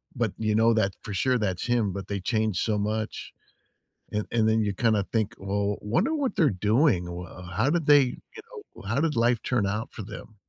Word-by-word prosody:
but 115 -5 -1
you 110 -1 0
know 115 +1 +4
that 100 -3 +2
for 105 - -6
sure 125 +6 +2
that's 95 -4 -2
him, 115 -5 +1
but 100 -1 -6
they 100 -1 -3
changed 110 -1 0
so 110 -2 0
much. 110 +1 -3 0.8
And 105 0 -1
and 110 -2 +3
then 110 0 +3
you 105 -1 0
kinda 110 -2 +2
think, 110 0 0
"Well, 100 +1 -1
wonder 175 - 0
what 275 -8 -1
they're 155 -5 +4
doing, 105 - +2
wha 90 +1 -8
how 135 - +2
did 170 -2 0
they," 145 -1 +8
you 125 -1 -6 0.4
know, - - -12
"how 115 +9 0
did 160 -3 0
life 120 0 +2
turn 120 -6 +1
out 105 +3 -3
for - - -7
them?" 110 - -10
110 Hz, 210 wpm, -26 LUFS, 100-120 Hz, 0.8 s, they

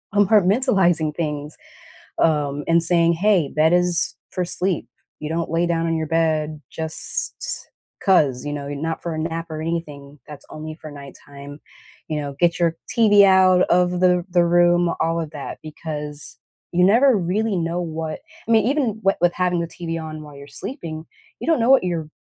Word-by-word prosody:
compartmentalizing 195 - +3
things, 150 -2 -4 0.6
um, 145 -3 +1
and 165 0 +4
saying, 170 0 +5
"Hey, 185 -4 +2
bed 155 +2 +3
is 180 -1 +2
for 180 - -2
sleep." 180 -1 -1 0.3
You 150 - -4
don't 165 +1 -2
lay 165 +1 +1
down 165 -1 0
on 165 0 0
your 160 - -2
bed 155 -1 0
just 160 -1 -3 0.7
'cause, 145 - +2
you 145 - -3
know? 140 -1 -5
Y 145 - -4
not 160 +3 -4
for 170 -2 -4
a - - -4
nap 165 +1 -3
or 155 0 -5
anything, 150 -3 -5
that's 150 -1 -12
only 155 0 -7
for 155 -1 -11
nighttime, 140 0 -12 0.5
you 155 - -2
know, 140 -1 -5
get 170 -1 +2
your 170 -1 +1
TV 205 -3 +5
out 185 -1 +5
of 180 0 +2
the 180 -1 +3
the 175 -1 +3
room, 175 0 +3
all 165 +1 0
of 160 - -5
that, 145 -2 -7
because 150 -1 -7 0.3
you 180 +1 +2
never 245 +7 +5
really 200 +3 -1
know 170 0 -2
what 160 -2 -5 0.3
I - - -2
mean, 220 -2 +4
even 280 +2 +1 0.2
w 195 - +4
with 175 0 +2
having 180 -1 0
the 170 - -2
TV 165 -1 -5
on 155 -1 -7
while 150 -1 -12
you're 140 0 -11
sleeping, 160 - -7 0.4
you - - -5
don't 325 -7 +2
know 230 - +2
what 270 -8 +5
you're 165 -4 -3
165 Hz, 185 wpm, -21 LUFS, 155-180 Hz, 0.7 s, saying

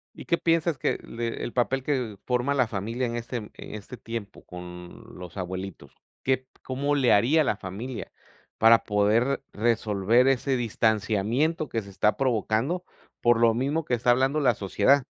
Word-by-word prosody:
¿Y - - -10
qué 170 - +2
piensas 165 -1 +1
que - - -1
le 115 0 -4
el - - -4
papel 130 +2 +1
que 125 -7 -2
forma 125 +2 +1
la 130 -4 +3
familia 115 +5 -2
en 120 0 -3
este 120 +1 -4
en 105 -2 -9 0.2
este 105 +4 -8
tiempo 115 -3 -7
con 90 0 -10
los 90 0 -10
abuelitos? 95 -6 -6 0.3
¿Qué 130 0 0 0.2
cómo 140 +3 -1
le 135 -4 +3
haría 140 +10 +4
la 105 - 0
familia 105 +6 -6 0.5
para 115 +1 +6
poder 110 +7 +2
resolver 110 +2 +2
ese 135 0 +1
distanciamiento 115 +7 +1
que 115 - -1
se 100 - -13
está 105 +2 +1
provocando 130 +6 0 0.4
por 120 -1 +4
lo 115 -1 +5
mismo 140 +6 0
que 125 - +1
está 120 +1 +2
hablando 135 +4 +3
la 125 -5 +4
sociedad? 105 +8 +3
120 Hz, 165 wpm, -26 LUFS, 105-135 Hz, 0.5 s, para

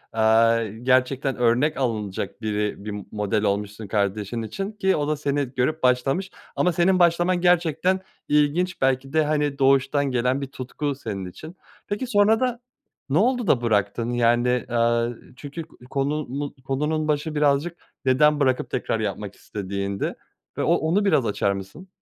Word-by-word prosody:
eee, 110 0 +3
gerçekten 130 +1 +2
örnek 125 +5 +2
alınacak 105 -5 -3
biri 105 -1 -2
bir 105 - -4 0.2
model 105 0 -1
olmuşsun 105 +1 -2
kardeşin 105 +2 -1
için 195 - -4
ki 190 -3 +1
o 145 -1 -1
da 155 0 0
seni 145 -1 0
görüp 145 +5 0
başlamış. 135 +9 +1 0.2
Ama 180 - +2
senin 180 +3 +3
başlaman 175 +1 +3
gerçekten 175 +1 +2 0.3
ilginç 150 +5 +1
belki 135 0 +1
de, 160 0 +4
hani, 150 -2 0
doğuştan 135 +1 +3
gelen 125 +2 +1
bir 140 - -3
tutku 135 +2 -4
senin 105 -7 -5
için. 155 - -10 0.3
Peki, 205 +5 -3
sonrada 225 +3 +2 0.5
ne 140 - +2
oldu 245 +3 +2
da 130 -7 +3
bıraktın? 115 +1 0
Yani, 120 +1 +2
eee, 115 0 +2 0.3
çünkü 145 +5 -7
k 160 - -20
konunu 140 0 -2
konunun 150 +4 -1
başı 150 +1 -1
birazcık 150 +3 +1 0.3
neden 150 +3 +4
bırakıp 130 -3 +1
tekrar 115 -2 -1
yapmak 105 -1 -4
istediğindi 100 -1 -4 0.4
ve - - 0
o - - +3
onu 175 +6 +1
biraz 140 -10 +3
açar 100 -2 0
mısın? 100 - -7
135 Hz, 150 wpm, -24 LUFS, 115-155 Hz, 0.5 s, de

